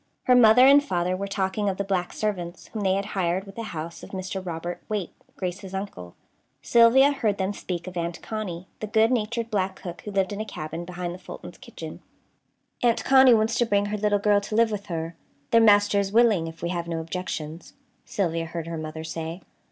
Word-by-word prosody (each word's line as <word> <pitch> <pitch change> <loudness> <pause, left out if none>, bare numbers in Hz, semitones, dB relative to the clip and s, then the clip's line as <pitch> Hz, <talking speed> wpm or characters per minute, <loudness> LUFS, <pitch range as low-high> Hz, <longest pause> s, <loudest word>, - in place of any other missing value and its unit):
Her 250 - +4
mother 245 +1 +7
and 280 +1 +7
father 180 -7 0
were 200 +2 -4
talking 195 +1 -1
of 190 - -3
the 200 - -1
black 190 -2 -1
servants, 180 -5 -4
whom 220 - -5
they 190 -1 +2
had 200 0 -1
hired 185 0 0
with 195 0 -12
the 230 - -5
house 165 +1 -6
of - - -10
Mr. 190 0 -5
Robert 175 0 -5
Waite, 210 -4 -3 0.2
Grace's 190 +1 -5
uncle. 90 - -6 0.5
Sylvia 235 - +6
heard 220 -8 0
them 190 +1 -1
speak 175 -3 -5
of 185 -1 -8
Aunt 170 0 -3
Connie, 185 -5 -5
the 215 - -4
good 220 +2 +3
natured 230 0 -1
black 190 -2 0
cook, 175 -2 -8
who - - -7
lived 195 -1 0
in 205 - -4
a - - -1
cabin 165 -4 -6
behind 175 0 -5
the 180 - -9
Fultons' - - -10
kitchen. - - -9 0.8
"Aunt 235 -1 +2
Connie 265 -2 +7
wants 225 +2 +1
to 240 - +4
bring 205 -1 +2
her 210 +1 -2
little 205 0 +2
girl 205 0 +3
to 210 +1 -5
live 230 0 +4
with 205 -1 -4
her. 165 -2 -4 0.4
Their 230 - +6
master 205 -2 +5
is 195 -1 -1
willing, 215 -7 +4
if 165 0 -10
we 170 - -1
have 170 -1 -3
no 165 -1 -2
objections," 165 -1 -5 0.3
Sylvia 165 -4 -1
heard 165 0 -5
her 165 -1 -5
mother 155 0 -6
say. 160 +2 -5
195 Hz, 215 wpm, -25 LUFS, 175-215 Hz, 0.8 s, mother